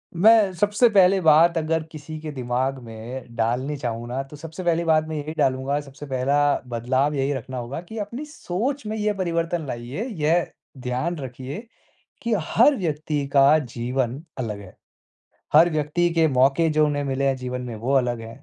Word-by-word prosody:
मैं 210 +2 +6
सबसे 205 +6 +3
पहले 190 0 +6
बात 165 +1 +5
अगर 160 0 0
किसी 155 0 -8
के 155 0 -6
दिमाग 130 0 -2
में 115 +2 -8
डालनी 125 +5 0
चाहूँ 120 -3 -4
ना, 125 +3 -2
तो 135 +2 -13
सबसे 160 +4 -8
पहली 170 -1 +1
बात 155 -1 +4
मैं 160 - -4
यही 150 +1 -4
डालूँगा 135 +2 +1
सबसे 145 +1 -11
पहला 135 +1 0 0.3
बदलाव 130 +5 0
यही 140 0 0
रखना 130 0 -6
होगा 125 +5 -5
कि 220 +6 -10
अपनी 235 +8 -5
सोच 265 -1 -3
में 215 - -3
ये 210 0 0
परिवर्तन 170 -3 -1
लाइए। 120 - -4 0.2
यह 165 +3 +2 0.3
ध्यान 130 +7 -2
रखिए 130 +4 -6 0.6
कि 235 -1 +1
हर 235 - +4
व्यक्ति 150 - -2
का 140 +2 +6
जीवन 125 +1 -3 0.2
अलग 105 -5 -4
है। 95 -2 -12 0.8
हर 165 +3 +7
व्यक्ति 155 +3 +1
के 165 -1 +4
मौके 135 +4 +3
जो 155 0 +3
उन्हें 145 -1 -1
मिले 140 0 -1
हैं 135 -1 +2
जीवन 125 0 -4
में 120 -2 -6
वो 120 +5 -2
अलग 120 -3 +1
हैं। 115 +5 -10
145 Hz, 180 wpm, -23 LUFS, 130-170 Hz, 0.8 s, हर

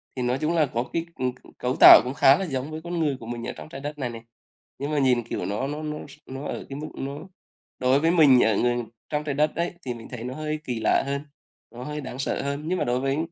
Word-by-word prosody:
thì 130 - -3
nói 125 +2 +1
chung 155 +2 +1
là 155 - +4
có 120 - 0
cái, 165 0 -1
ừm, 130 -1 -1
c 125 - -20
cấu 125 +1 -1
tạo - - +11
cũng 125 - -4
khá 140 -1 +6
là 195 - -2
giống 135 -2 -3
với 155 +1 -6
con 170 0 -3
người 145 -4 0
của 115 - -10
mình 120 +1 -5
ở - - -4
trong - - -10
Trái 155 - -8
Đất 150 +1 -5
này 130 -4 -2
này. 115 -1 -8 0.6
Nhưng 140 +2 -3
mà 150 - +1
nhìn, 125 -3 +3
kiểu, 115 - -4
nó 105 +6 -2
nó 150 +2 -5
nó 150 0 -4
s 145 - -14
nó 135 +2 -7
ở - - -5
cái 135 - -6
mức 155 - -5
nó 140 +2 -5 0.6
đối 130 +2 +3
với 165 +2 +3
mình 145 -7 +6
ở 110 -1 +2
ở 120 0 +2 0.3
trong 150 0 -1
Trái 145 -2 -3
Đất 150 +1 +1
ấy 170 +1 -1
thì 125 - -2
mình 115 -1 -10
thấy 120 -3 -7
nó 125 +1 -4
hơi 155 0 -3
kỳ 125 -5 -3
lạ - - +2
hơn, 140 0 -2 0.5
nó 120 +2 -8
hơi 150 +2 -5
đáng 130 -1 -7
sợ 135 - -1
hơn. 140 +1 -3
Nhưng 180 +1 0
mà - - +1
đối 125 +1 +1
với 135 +1 0
140 Hz, 290 wpm, -25 LUFS, 125-150 Hz, 0.6 s, tạo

